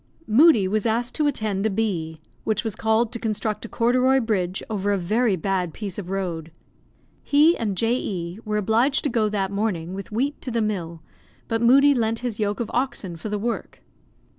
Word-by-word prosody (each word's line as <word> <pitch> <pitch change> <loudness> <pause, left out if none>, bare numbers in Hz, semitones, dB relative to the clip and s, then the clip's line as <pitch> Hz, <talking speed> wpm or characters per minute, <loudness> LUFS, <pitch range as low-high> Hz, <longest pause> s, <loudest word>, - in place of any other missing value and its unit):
Moodie 225 - +5
was 215 +3 0
asked 235 +2 0
to 305 -2 +1
attend 215 -8 -1
a - - 0
bee, 175 -7 -2 0.2
which 215 -1 0
was 225 -3 -3
called 220 +1 +1
to 235 - -3
construct 215 -1 -2
a - - -8
corduroy 255 +3 +3
bridge 195 -6 -1
over 205 -2 -1
a 200 - +2
very 210 +4 +1
bad 180 -1 -2
piece 205 -3 -5
of 180 -3 -7
road. 175 -4 -3 0.7
He 305 +4 +4
and 205 -4 -2
J. 230 +4 +2
E 175 -4 -4
were 210 -1 -1
obliged 225 +7 +2
to 285 - 0
go 220 -2 +1
that 195 -2 -1
morning 195 -5 -2
with 195 +1 -7
wheat 270 +7 -1
to - - -4
the 235 -1 -1
mill, 175 -7 -3 0.4
but 225 0 -1
Moodie 275 +4 +6
lent 225 -3 0
his 225 -3 -3
yoke 205 -1 -1
of 235 - -3
oxen 240 -8 -2
for 165 +6 -6
the 210 - -1
work. 230 +3 -4
215 Hz, 195 wpm, -23 LUFS, 195-235 Hz, 0.7 s, Moodie